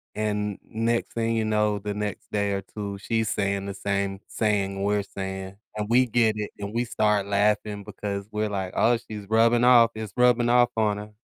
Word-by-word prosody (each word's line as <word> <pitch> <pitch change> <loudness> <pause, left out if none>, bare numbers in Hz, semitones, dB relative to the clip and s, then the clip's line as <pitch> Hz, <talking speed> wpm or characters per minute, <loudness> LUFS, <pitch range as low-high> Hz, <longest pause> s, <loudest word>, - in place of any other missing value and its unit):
and 105 -1 -1
next 115 +1 -1
thing 115 0 0
you 110 - 0
know, 105 -1 +1
the 105 +1 -4
next 105 -1 -4
day 100 -1 +1
or 100 - -1
two 100 +1 -6
she's 110 +1 -1
saying 100 -1 -1
the 100 - -4
same 100 0 -2
saying 100 -3 0
we're 105 0 +1
saying, 95 -1 -6 0.2
and 105 0 -2
we 125 +2 +5
get 115 -2 +2
it, 105 -1 -4
and 100 +1 -5
we 120 +1 +1
start 105 -4 +1
laughing 105 0 +1
because 100 -1 -5
we're 105 0 -1
like, 95 -2 -3
"Oh, 120 +1 +4
she's 105 -3 -9
rubbing 115 +2 +4
off 120 -2 +7
It's 110 -2 -6
rubbing 125 -1 +4
off 120 0 +4
on 105 -2 +2
her." 105 +1 -8
105 Hz, 200 wpm, -25 LUFS, 100-115 Hz, 0.2 s, off